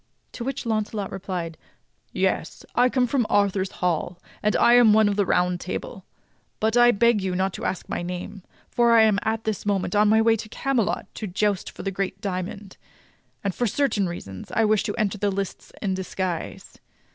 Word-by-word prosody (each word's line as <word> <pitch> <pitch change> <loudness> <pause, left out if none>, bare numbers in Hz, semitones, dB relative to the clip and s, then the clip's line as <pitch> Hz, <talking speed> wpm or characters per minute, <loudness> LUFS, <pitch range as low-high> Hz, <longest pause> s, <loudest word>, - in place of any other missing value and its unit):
To 235 - -6
which 270 0 -4
Launcelot 215 -2 -2
replied: 180 -4 -5 0.5
"Yes, - - -1
I 250 +1 +4
come 255 0 +2
from 245 -2 0
Arthur's 200 -2 +2 0.2
Hall, 175 0 -1 0.2
and 210 - +1
am 240 -2 +6
one 215 0 +5
of 205 - +1
the 200 -2 +1
Round 180 0 +1
Table; - - -6 0.5
but 220 +1 +1
I 240 0 +7
beg 235 -1 +3
you 190 -1 -2
not 190 +1 0
to - - -6
ask 185 - -3
my - - -3
name, 180 +3 -6 0.3
for 235 -1 +3
I 225 -1 +7
am 215 -2 +3
at 220 0 -1
this 220 -3 -2
moment 200 -2 -1
on 210 0 +4
my 220 +1 +5
way 225 0 +4
to 215 - -8
Camelot 240 -3 -1
to 215 - -5
joust 200 +1 0
for - - -10
the 195 - -2
great 195 0 -3
diamond; 195 0 -5 0.7
and 195 -2 -1
for 245 - 0
certain 210 -6 +1
reasons 100 - -8
I 225 - +2
wish 215 -1 +3
to 205 - -2
enter 210 -2 -1
the 205 0 +1
lists 195 -1 -4
in 195 -2 0
disguise. 185 -2 -4
205 Hz, 190 wpm, -24 LUFS, 190-225 Hz, 0.7 s, I